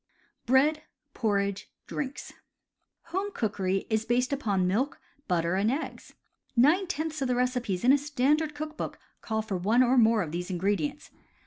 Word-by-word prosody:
BREAD, 290 +5 +4 0.3
PORRIDGE, 200 -3 -1 0.2
DRINKS 285 -1 -5 0.8
IJOME 390 +3 -1
cookery 195 -3 -1
is 220 -1 0
based 245 +4 +1
upon 205 -9 0
milk, 225 +10 0 0.3
butter, 170 -2 +1
and 200 +3 +2
^ggs: 275 +6 -4 0.4
nine 310 +11 +4
tenths 315 -3 -3
of 265 - +1
the 250 - +1
recipes 245 -7 -1
in 255 +3 +6
a 285 - +4
standard 295 +2 +1
cook 305 +1 -5
book - - -5 0.2
call 220 -1 -2
for 200 -3 -3
one 220 +8 +3
or 255 +1 +4
more 225 -2 +4
of 155 - -6
these 175 +2 -4
ingredients. 185 -3 -1
240 Hz, 155 wpm, -28 LUFS, 200-285 Hz, 0.8 s, in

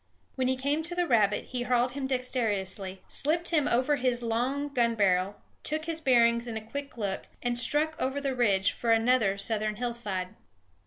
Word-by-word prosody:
When 260 -1 0
he 260 - +2
came 285 +4 0
to 345 +2 -3
the 355 0 +1
rabbit 215 -7 +2
he 250 -1 -3
harled 245 0 +1
him 270 +1 -3
dexterously, 205 -7 -2
slipped 330 +4 -1
him 305 -4 +2
over 260 +5 +2
his 250 -2 0
long 250 +6 -1
gun 235 -3 +2
barrel, 195 -1 +2 0.3
took 310 +1 -2
his 325 -1 -3
bearings 235 -3 +3
in 225 -2 -4
a 220 - -7
quick 280 +3 -7
look, 200 -3 -3 0.2
and 245 0 0
struck 300 +6 +3
over 265 +2 0
the 275 -1 -1
ridge 200 -6 +2
for 235 - -4
another 225 -3 +3
southern 215 +1 -1
hillside. 215 -6 -3
245 Hz, 180 wpm, -28 LUFS, 215-275 Hz, 0.3 s, bearings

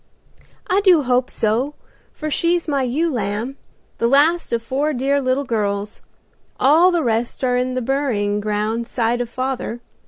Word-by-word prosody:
"I 385 +2 +2
do 360 -7 +5
hope 250 0 +1
so, 240 +7 0 0.4
for 310 0 -5
she's 340 +3 +1
my 280 -3 0
ewe 290 +6 0
lamb, 220 +4 -3 0.4
the 230 - +2
last 305 +7 +3
of 230 -1 -1
four 280 +6 -1
dear 275 +2 +1
little 260 +1 0
girls; 210 -4 -2 0.6
all 320 +7 +5
the 345 -3 +1
rest 235 +1 -1
are 250 -1 +2
in 255 +1 -1
the 255 - -1
burying 230 -6 0
ground 215 +2 -2
'side 240 0 0
of 240 - -4
father. 255 -1 -3
255 Hz, 160 wpm, -20 LUFS, 230-285 Hz, 0.6 s, do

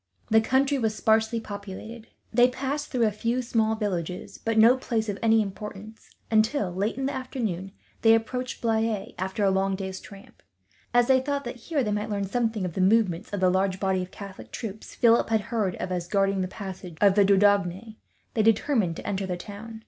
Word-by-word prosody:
The 220 0 +6
country 270 +4 +2
was 220 -3 0
sparsely 220 +1 +2
populated. 210 +2 -8 0.3
They 245 +2 +6
passed 270 +3 -3
through 245 -3 +1
a 215 - +2
few 230 +4 -1
small 220 -2 +1
villages, 180 -5 -4
but 225 -1 -1
no 230 +3 +7
place 230 -4 -2
of 200 - -3
any 225 -1 +4
importance 210 +2 -9 0.2
until, 220 -3 +2
late 200 +6 -1
in 270 - -2
the 275 - -1
afternoon, 225 -8 -4 0.3
they 225 0 +6
approached 250 +3 -3
Blaye, 220 -1 0
after 190 +3 -2
a 195 - +4
long 195 0 +1
day's 190 -1 -5
tramp. 200 -1 -14 0.5
As 245 0 +4
they 260 +1 +4
thought 280 +1 -2
that 240 +1 -6
here 300 -5 +1
they 210 - -1
might 210 +1 -2
learn 200 -1 -1
something, 220 -1 -1
of 175 - -4
the 190 - -1
movements 195 -2 +2
of 205 -2 -3
the 185 -1 +4
large 190 0 0
body 190 -1 +1
of 180 - -6
Catholic 200 -1 -10
troops 215 -2 -7
Philip 235 -1 +4
had 220 -1 +2
heard 210 -4 -1
of 185 - -5
as 175 -1 -2
guarding 195 0 +1
the 185 - -1
passages 185 -3 -8
of 200 -2 +5
the 205 0 +5
Dordogne, 200 +1 +2 0.4
they 220 - +2
determined 220 - +2
to - - -8
enter 195 -1 -2
the 180 -1 -3
town. 215 +4 -9
215 Hz, 200 wpm, -26 LUFS, 195-230 Hz, 0.5 s, no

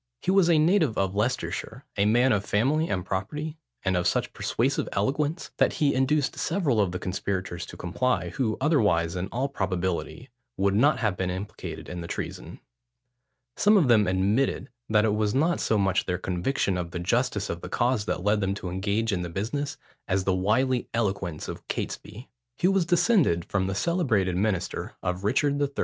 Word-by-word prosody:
He - - +2
was 190 -3 +4
a 165 - +5
native 155 - +3
of 95 -1 0
Leicestershire: 125 +5 -2
a 100 0 +2
man 120 +4 +4
of 105 -3 +1
family 135 +11 +1
and 90 -2 -1
property, 150 - -4 0.3
and 95 -1 +2
of 90 -1 +1
such - - 0
persuasive - - 0
eloquence, 145 - -1
that - - +3
he 145 -3 +2
induced 135 +2 +1
several 155 - +1
of 95 -3 0
the 90 - -3
conspirators 90 -2 -3
to - - -10
comply, 90 0 -1
who 110 +4 -1
otherwise, 105 - +2
in 90 +1 -2
all 125 +6 -1
probability, 95 - -3 0.3
would 100 0 +2
not 140 +9 +4
have 105 -5 +1
been 90 0 -2
implicated 95 +3 -6
in 90 -1 -6
the 85 - -6
treason. - - -6 1.0
Some 210 +1 +5
of 155 -10 +3
them 110 -4 +5
admitted, 100 +8 +1 0.2
that 105 0 +4
it 105 - +2
was 105 0 0
not 165 +5 +2
so 110 - +1
much 95 -2 +1
their 90 -1 0
conviction 90 +2 -1
of 85 -1 -4
the 85 - -5
justice 105 +2 0
of 85 - -4
the - - -7
cause 120 -3 +1
that 90 - -2
led 105 +1 +2
them 95 0 0
to 90 -3 -5
engage 100 +4 0
in 90 - -1
the 90 - -4
business, 115 - -3 0.3
as 95 0 +1
the 95 - +1
wily 120 +7 +1
eloquence 95 -8 -2
of - - -8
Catesby. 120 +5 -5 0.3
He 180 - +2
was 190 -3 +2
descended 175 - +3
from 95 -2 -1
the 95 - -2
celebrated 110 - +1
minister 95 -2 -1
of 90 +1 -2
Richard 140 +6 +1
III. 140 - +2
105 Hz, 190 wpm, -26 LUFS, 95-135 Hz, 1.0 s, a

